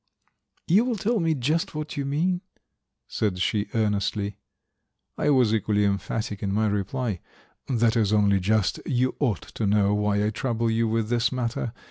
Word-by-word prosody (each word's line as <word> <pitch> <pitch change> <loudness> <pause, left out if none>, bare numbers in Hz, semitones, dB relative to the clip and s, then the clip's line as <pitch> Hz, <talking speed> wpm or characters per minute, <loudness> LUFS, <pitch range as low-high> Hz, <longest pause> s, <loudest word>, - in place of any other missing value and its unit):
"You 195 +7 +5
will 245 -2 -1
tell 220 +3 0
me 165 -2 +1
just 150 +5 -1
what 150 0 -4
you 140 - -2
mean?" 175 +6 0 0.7
said 100 -4 -1
she 100 +3 0
earnestly. 105 -1 0 0.8
I - - 0
was 125 -6 +4
equally 105 -2 +1
emphatic 100 +1 -2
in 100 - -1
my 110 +2 +1
reply. 105 +1 -1 0.5
"That 115 -3 +2
is 110 -3 +2
only 100 -2 +3
just. 105 +2 +1
You 130 0 +1
ought 120 - 0
to 110 - -1
know 100 0 +3
why 105 0 +1
I 105 - 0
trouble 115 0 -1
you 115 0 +1
with 110 -1 -1
this 120 0 +1
matter. 120 -2 -2
110 Hz, 165 wpm, -25 LUFS, 105-130 Hz, 0.8 s, You